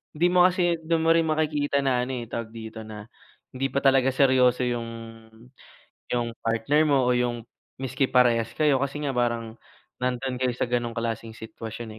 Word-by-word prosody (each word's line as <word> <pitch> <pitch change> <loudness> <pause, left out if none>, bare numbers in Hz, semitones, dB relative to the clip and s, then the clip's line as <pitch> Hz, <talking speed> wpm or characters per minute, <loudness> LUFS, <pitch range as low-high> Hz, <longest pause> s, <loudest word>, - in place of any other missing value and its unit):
di 170 +3 +3
mo 180 0 +5
kasi 180 -2 +1
dun 160 0 0
mo - - +6
rin 165 - +3
makikita 150 -2 0
na 125 -2 +1
ano 130 - -5
eh, - - -11
tawag 115 -1 -5
dito, 110 0 -8
na 105 0 -9 0.5
hindi 135 +1 0
pa 140 - +1
talaga 135 -1 +4
seryoso 130 -2 +3
yung 120 -1 -2 1.2
yung 120 -1 -1
partner 115 +7 +1
mo 135 -3 +3
o 125 - +3
yung 120 -1 -1 0.3
miski 130 0 -1
parehas 120 -3 +3
kayo 145 -4 +3
kasi 140 +1 -2
nga 140 - -1
parang 120 -2 -2 0.4
nandun 125 0 -2
kayo 130 - +2
sa - - 0
ganong 120 -1 -2
klaseng 115 -1 -4
sitwasyon 110 +1 -8
125 Hz, 175 wpm, -25 LUFS, 115-140 Hz, 1.2 s, mo